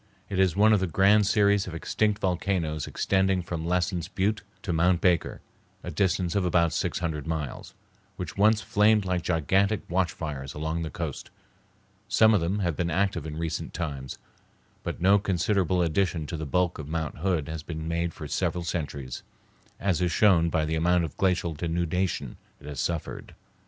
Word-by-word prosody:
It 95 - -2
is 95 -3 +3
one 110 +2 +5
of 105 - +4
the 95 - 0
grand 100 +4 +4
series 100 -2 +3
of 85 - -6
extinct 105 +5 0
volcanoes 90 -5 -1
extending 95 -1 +1
from 85 -1 -4
Lassen's 90 -1 0
Butte 100 +2 -1 0.2
to 90 - -2
Mount 90 +2 +3
Baker, 90 -2 +1 0.4
a - - -5
distance 90 -3 0
of 100 - +1
about 85 -2 +2
six - - -1
hundred 80 -3 -3
miles, 80 -5 -4 0.4
which 90 -3 -6
once 105 +2 +4
flamed 105 +1 +3
like 90 -1 0
gigantic 95 +5 +1
watch 90 -1 +1
fires 70 -4 -6
along 80 +2 -2
the 80 - -3
coast. - - -5 0.8
Some 110 +1 +5
of 100 - +3
them 90 +5 0
have 85 -3 0
been 85 +2 -1
active 90 -2 0
in 75 0 -6
recent 80 -1 -4
times, 70 -6 -4 0.6
but - - -5
no 100 +3 +5
considerable 95 -1 +1
addition 85 -1 0
to 85 - -5
the 80 -1 -4
bulk 90 +4 0
of 75 - -6
Mount 80 -1 -3
Hood 85 -4 0
has 80 -1 -5
been 80 0 -6
made 85 +1 -1
for 75 - -8
several 85 +3 -1
centuries, 70 -6 -4 0.6
as 95 -3 0
is 90 -1 +1
shown 85 -3 +4
by 80 -2 +1
the 80 - -2
amount 85 +2 +2
of 80 - -5
glacial 90 -3 +1
denudation 85 +3 -2 0.2
it 70 - -15
has 75 -1 -6
suffered. 85 -2 -4
85 Hz, 180 wpm, -27 LUFS, 80-95 Hz, 0.8 s, one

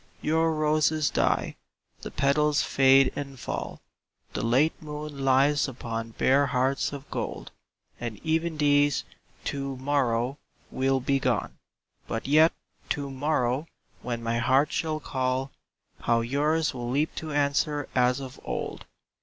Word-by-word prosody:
Your 160 +1 +2
roses 155 0 +2
die - - 0 0.2
— - - -39
the - - -6
petals 145 +1 +2
fade 135 0 +5
and 140 -2 -6
fall; - - -5 0.5
The - - -3
late 130 +8 +2
moon 150 -2 -6
lies 140 +2 +3
upon 115 -3 -5
bare 140 +2 +4
hearts 130 +1 0
of 140 0 -8
gold - - -4 0.5
And 120 -3 -5
even 160 0 0
these, 145 -1 +3 0.4
to 135 -1 -3
morrow, 130 -1 0 0.3
will 135 0 +1
be 135 +2 +1
gone; 125 -5 -1 0.5
But 115 +3 -3
yet, 155 +3 +6 0.4
to 140 -2 -2
morrow, 135 0 0 0.3
when 120 -1 -4
my 115 0 0
heart 130 +5 +3
shall 155 -1 -1
call, 130 -1 -2 0.5
How 115 0 +2
yours 150 +6 +1
will 120 -2 -4
leap 145 +5 0
to 160 -1 -4
answer 145 0 +1
as 125 0 +3
of 130 -2 -8
old! - - -5
140 Hz, 135 wpm, -27 LUFS, 130-150 Hz, 0.5 s, yet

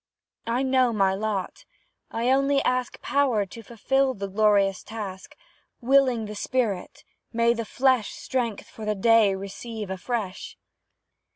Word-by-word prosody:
I 240 +3 0
know 260 -2 +3
my 195 -3 +2
lot 200 -1 -3 0.5
I 235 +3 0
only 275 +1 +3
ask 255 -1 -1
Power 260 -8 +2
to 230 +4 -11
fulfil 260 +4 0
the 200 -1 -4
glorious 200 -1 +2
task; 200 -4 -8 0.4
Willing 255 -3 +3
the 210 - -6
spirit, 215 -4 -2 0.3
may 235 0 +3
the 230 -1 -4
flesh 255 -2 +1
Strength 235 -5 -3
for 220 - -11
the 210 0 -1
day 215 -1 +4
receive 200 +2 -6
afresh. 195 0 -4
225 Hz, 130 wpm, -25 LUFS, 200-255 Hz, 0.5 s, day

